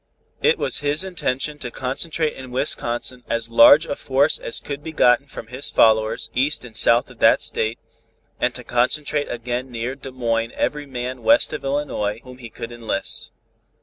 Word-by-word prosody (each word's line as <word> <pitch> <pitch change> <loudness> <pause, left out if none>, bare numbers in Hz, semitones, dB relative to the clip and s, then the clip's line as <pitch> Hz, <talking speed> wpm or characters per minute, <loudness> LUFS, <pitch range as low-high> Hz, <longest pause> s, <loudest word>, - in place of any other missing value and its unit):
It 465 0 +3
was - - +2
his 145 +4 -1
intention 150 -5 -3
to 125 - -5
concentrate 150 +6 -2
in 130 -1 -10
Wisconsin 125 -1 0
as 115 0 -2
large 140 +7 +8
a 145 - -3
force 140 +3 +1
as - - -3
could 140 0 -6
be 160 - -6
gotten 130 -2 +3
from 135 - -9
his 125 +5 -4
followers 110 0 +2
east 135 +1 0
and 115 -3 -12
south 115 +2 +3
of - - -17
that - - +5
state, 110 +2 -1 0.6
and - - 0
to - - -7
concentrate 145 +4 0
again 120 +2 -4
near 120 +1 -4
Des 135 0 -9
Moines 115 -2 -1
every 150 -1 -2
man 125 -1 -5
west 290 +1 +4
of - - -5
Illinois 135 -7 -2
whom 125 0 -13
he 120 -2 -9
could 115 +1 -8
enlist. 115 -4 -4
125 Hz, 180 wpm, -22 LUFS, 115-145 Hz, 0.6 s, large